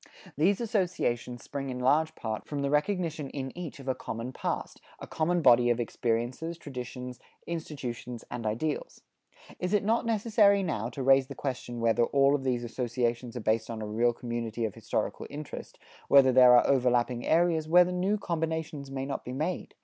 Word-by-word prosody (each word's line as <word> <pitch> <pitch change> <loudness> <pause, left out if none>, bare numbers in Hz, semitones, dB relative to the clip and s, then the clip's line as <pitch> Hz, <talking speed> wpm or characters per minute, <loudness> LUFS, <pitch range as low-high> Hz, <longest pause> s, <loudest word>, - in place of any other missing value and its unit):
These 185 +7 +2
associations 175 - -1
spring 140 -1 -5
in 125 - -4
large 145 +5 +2
part 110 -2 -5
from 145 -2 -3
the 140 - 0
recognition 160 -2 0
in 135 -1 -6
each 170 -5 -7
of 135 - -11
a 130 - +2
common 115 +1 -6
past, - - -4 0.2
a - - -7
common 170 +1 0
body 120 -2 +6
of 120 0 +2
experiences, 120 +8 -2
traditions, 125 -4 -7 0.3
institutions 125 -8 -6
and 120 -1 -4
ideals. 145 +8 -3 0.6
It 180 - -2
is 205 - +3
not 230 +3 +1
necessary 210 -3 +3
now 120 - -2
to 130 +2 -5
raise 135 0 +5
the 140 - -8
question 125 -3 -4
whether 115 +1 +3
all 140 +1 +3
of 145 -2 0
these 125 -2 0
associations 120 0 -2
are - - -4
based 110 +1 0
on 115 -1 -5
a 110 - -4
real 115 +3 +2
community 120 -1 -3
of 105 - -3
historical - - -3
interest, 150 0 -8 0.3
whether 135 -2 +7
there 125 -1 +8
are - - +4
overlapping 125 -2 +2
areas, 165 -1 +2
whether 180 +1 +6
new 185 +4 0
combinations 160 -5 -3
may 135 0 -4
not 140 - -4
be 125 - -6
made? 155 +7 -3
135 Hz, 180 wpm, -29 LUFS, 120-160 Hz, 0.6 s, there